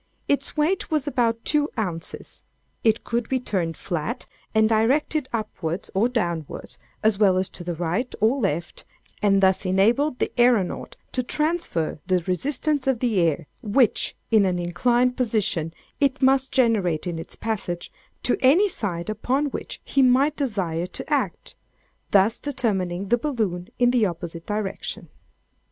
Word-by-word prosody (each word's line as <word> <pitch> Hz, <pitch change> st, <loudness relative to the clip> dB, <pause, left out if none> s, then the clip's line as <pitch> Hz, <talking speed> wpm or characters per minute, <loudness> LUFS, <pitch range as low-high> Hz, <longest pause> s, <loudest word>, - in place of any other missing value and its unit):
Its 285 Hz, +2 st, -1 dB
weight 325 Hz, +6 st, +1 dB
was 305 Hz, -3 st, 0 dB
about 235 Hz, -5 st, 0 dB
two 300 Hz, 0 st, +2 dB
ounces. 180 Hz, -6 st, -4 dB, 0.4 s
It 220 Hz, -1 st, +3 dB
could 235 Hz, -1 st, -2 dB
be 260 Hz, -, +1 dB
turned 180 Hz, -9 st, -2 dB
flat, 185 Hz, -, -3 dB, 0.3 s
and 220 Hz, 0 st, +5 dB
directed 260 Hz, +6 st, +2 dB
upwards 195 Hz, -6 st, -3 dB
or 210 Hz, +5 st, +2 dB
downwards, 170 Hz, -, -3 dB, 0.2 s
as 215 Hz, -2 st, +3 dB
well 195 Hz, -3 st, +5 dB
as 185 Hz, 0 st, -1 dB
to 175 Hz, -, -8 dB
the 175 Hz, -1 st, -3 dB
right 175 Hz, +9 st, -1 dB
or 230 Hz, +6 st, +3 dB
left; 170 Hz, -, -2 dB, 0.4 s
and 195 Hz, -2 st, +3 dB
thus 190 Hz, 0 st, +4 dB
enabled 230 Hz, +10 st, +2 dB
the -, -, -1 dB
æronaut 240 Hz, -7 st, +2 dB, 0.2 s
to 255 Hz, -, 0 dB
transfer 305 Hz, -, -1 dB
the 185 Hz, -2 st, +2 dB
resistance 275 Hz, -, 0 dB
of 265 Hz, -2 st, +3 dB
the 225 Hz, -4 st, +1 dB
air 165 Hz, -2 st, +1 dB, 0.2 s
which 225 Hz, +2 st, +2 dB, 0.2 s
in 220 Hz, -2 st, +6 dB
an 185 Hz, -2 st, +1 dB
inclined 240 Hz, +9 st, +1 dB
position 215 Hz, -, 0 dB, 0.3 s
it 280 Hz, -1 st, +2 dB
must 265 Hz, 0 st, +3 dB
generate 215 Hz, -, +2 dB
in 170 Hz, -2 st, -3 dB
its 165 Hz, -, -8 dB
passage, 195 Hz, -6 st, -4 dB, 0.3 s
to -, -, +2 dB
any 320 Hz, +11 st, +5 dB
side 180 Hz, -, -3 dB
upon 260 Hz, +7 st, 0 dB
which -, -, -6 dB
he 275 Hz, -, +2 dB
might 265 Hz, +4 st, +4 dB
desire 185 Hz, -, -1 dB
to -, -, -7 dB
act; -, -, -1 dB, 0.6 s
thus 205 Hz, +3 st, +4 dB
determining 195 Hz, -9 st, -1 dB
the 240 Hz, -, +3 dB
balloon 215 Hz, -11 st, -2 dB
in 245 Hz, -1 st, +4 dB
the 235 Hz, -4 st, +3 dB
opposite 170 Hz, -1 st, -6 dB
direction. 210 Hz, -2 st, -4 dB
220 Hz, 150 wpm, -24 LUFS, 180-255 Hz, 0.6 s, in